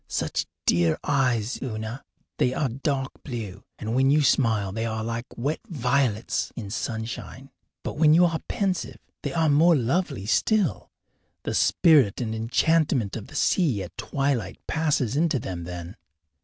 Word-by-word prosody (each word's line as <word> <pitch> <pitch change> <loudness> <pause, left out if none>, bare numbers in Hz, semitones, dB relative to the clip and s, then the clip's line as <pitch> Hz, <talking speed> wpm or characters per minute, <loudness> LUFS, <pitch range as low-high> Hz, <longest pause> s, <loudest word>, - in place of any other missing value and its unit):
Such - - -2 0.2
dear 85 -2 +3
eyes, 125 -4 +1
Una! 110 +1 -5 0.4
They 125 - +2
are 140 - 0
dark 135 +2 -2
blue, 110 -6 -6
and 110 +1 -4
when 135 +2 +3
you 150 +1 +4
smile 110 -7 +2
they 115 +3 -2
are 110 0 -3
like 115 +2 -4
wet 140 +6 -1
violets 125 - 0
in 105 -5 -6
sunshine. 115 +4 -5 0.3
But - - -5
when 155 -1 +6
you 175 +1 +6
are 165 -2 0
pensive 190 -4 -2 0.2
they - - -3
are 165 -2 +1
more 160 +4 +5
lovely 135 - 0
still 175 - +1 0.5
the - - -2
spirit 150 - +4
and 115 -3 -2
enchantment 125 +1 +1
of 110 - -6
the - - -13
sea 145 - +2
at 90 - -10
twilight 135 -4 -1
passes 150 -7 0
into 155 -1 +2
them 90 -7 -5
then. 90 +2 -7
125 Hz, 155 wpm, -25 LUFS, 110-150 Hz, 0.5 s, when